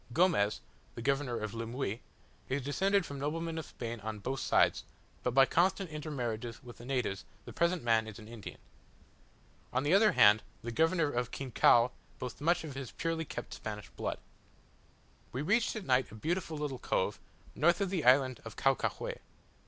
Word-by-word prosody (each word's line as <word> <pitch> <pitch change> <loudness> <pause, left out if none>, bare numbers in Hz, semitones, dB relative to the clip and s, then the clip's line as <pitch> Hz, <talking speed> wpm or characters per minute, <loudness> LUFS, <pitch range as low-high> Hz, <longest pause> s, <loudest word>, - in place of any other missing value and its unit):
Gomez, 150 - +3 0.3
the - - -6
governor 135 -2 0
of 110 -1 -4
Lemuy, 115 -1 -3 0.5
is 135 +1 -1
descended 195 +7 +2
from 140 -2 -6
noblemen 165 +3 -2
of 160 - -7
Spain 115 -1 -6
on 110 +1 -5
both 130 +6 -3
sides; - - +3 0.4
but 125 0 -1
by 135 0 +8
constant 185 +3 +1
intermarriages 125 -6 -4
with 120 -1 -11
the 120 - -10
natives 125 -9 -1 0.2
the - - -9
present 170 -1 +1
man 115 -1 +3
is 110 - -8
an 110 - -11
Indian. 115 -2 -9 1.1
On 130 +1 0
the 145 +4 +2
other 210 +2 +6
hand 105 +1 +7 0.2
the 120 - -4
governor 160 +3 +2
of 120 -1 -1
Quinchao 125 -2 +4 0.3
boasts 125 +2 -6
much 170 +3 +2
of 155 -3 -6
his 135 -2 -6
purely 165 -1 -2
kept - - -6
Spanish 105 -1 -6
blood. - - -4 1.1
We 130 +4 -3
reached 220 +9 +2
at 215 -3 -5
night 130 -2 +3
a - - -9
beautiful 160 - -2
little 145 -4 -3
cove, - - 0 0.3
north 170 +5 +3
of 195 -2 0
the 180 -6 0
island 130 -1 +4
of 115 - -9
Caucahue. 135 -2 0
135 Hz, 175 wpm, -32 LUFS, 115-165 Hz, 1.1 s, by